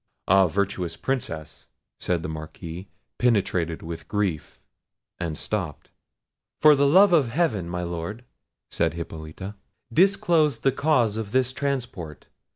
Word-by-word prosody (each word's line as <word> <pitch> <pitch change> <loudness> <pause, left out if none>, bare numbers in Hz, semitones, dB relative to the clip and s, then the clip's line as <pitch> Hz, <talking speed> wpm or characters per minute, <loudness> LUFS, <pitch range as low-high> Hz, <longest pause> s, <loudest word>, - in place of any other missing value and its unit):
"Ah, 95 0 +6
virtuous 90 -2 -2
Princess!" 85 - -4 0.3
said 85 -2 -1
the - - -3
Marquis, 80 +3 -7 0.3
penetrated 90 -8 +1
with 80 0 -7
grief, 100 -7 -2 0.6
and 85 -3 -3
stopped. 90 -8 -4 0.7
"For 155 -1 +8
the 140 0 +3
love 185 +5 +6
of 150 -7 +5
Heaven, 115 - 0
my 90 0 -3
Lord," 85 +8 -5 0.5
said - - 0
Hippolita, 80 +4 -7 0.4
"disclose 165 - +3
the 135 - +3
cause 125 -8 +2
of 110 -2 -5
this 130 0 +2
transport! 125 - -4
100 Hz, 125 wpm, -25 LUFS, 85-135 Hz, 0.7 s, For